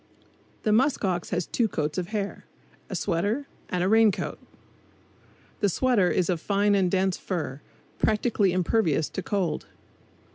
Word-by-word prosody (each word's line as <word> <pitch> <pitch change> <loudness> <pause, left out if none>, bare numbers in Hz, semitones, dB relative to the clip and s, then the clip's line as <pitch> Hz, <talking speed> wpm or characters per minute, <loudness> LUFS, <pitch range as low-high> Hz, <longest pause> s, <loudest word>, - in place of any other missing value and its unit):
The 215 - +2
musk 255 +1 +3
ox 180 -2 -1
has 175 -1 -1
two 235 - +1
coats 155 -3 -2
of 175 - -3
hair 205 -1 -4 0.4
a - - -4
sweater 205 +12 0 0.2
and 180 -1 0
a - - +2
rain 220 +1 +5
coat. - - -5 1.2
The 205 - +2
sweater 215 -3 +2
is 180 - +1
of 175 -4 -1
fine 205 +1 +2
and 190 -3 +3
dense 190 0 +1
fur, 155 -7 -4 0.4
practically 210 -3 +2
impervious 175 -4 +1
to - - -4
cold. 190 -4 -2
195 Hz, 150 wpm, -26 LUFS, 175-215 Hz, 1.2 s, rain